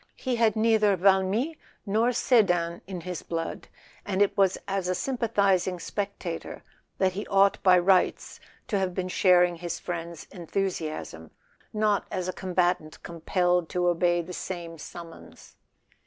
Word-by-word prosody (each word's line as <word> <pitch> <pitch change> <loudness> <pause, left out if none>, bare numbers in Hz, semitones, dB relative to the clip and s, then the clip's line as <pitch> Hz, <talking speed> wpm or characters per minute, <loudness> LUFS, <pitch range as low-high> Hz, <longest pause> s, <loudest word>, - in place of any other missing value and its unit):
He 255 -2 -2
had 225 -3 +3
neither 215 -2 +3
Valmy 195 - +2 0.3
nor 220 +4 +2
Sedan 175 -9 +2
in 185 -3 -6
his 180 0 -5
blood, 165 -1 -5 0.4
and 195 -2 -2
it 205 -1 +3
was 195 -2 +3
as 195 -2 -2
a - - +2
sym¬ 265 +8 -2
pathizing 195 -5 +1
spectator 195 -3 -5 0.3
that 190 -1 +2
he 200 +3 -6
ought 195 0 +3
by 185 -1 +6
rights 185 +1 +2 0.3
to 200 - +1
have 185 -2 -2
been 185 -1 -2
sharing 180 -2 +4
his 175 0 -4
friend's 170 -2 -6
enthusiasm, 165 - -4 0.4
not 210 -2 +1
as 185 -1 -3
a 185 - -2
com¬ 185 -1 -6
batant 175 -3 0
compelled 175 +1 0
to 180 0 0
obey 175 0 +2
the 180 +2 -9
same 170 -3 -6
summons. 165 +1 -11
185 Hz, 150 wpm, -27 LUFS, 175-200 Hz, 0.4 s, by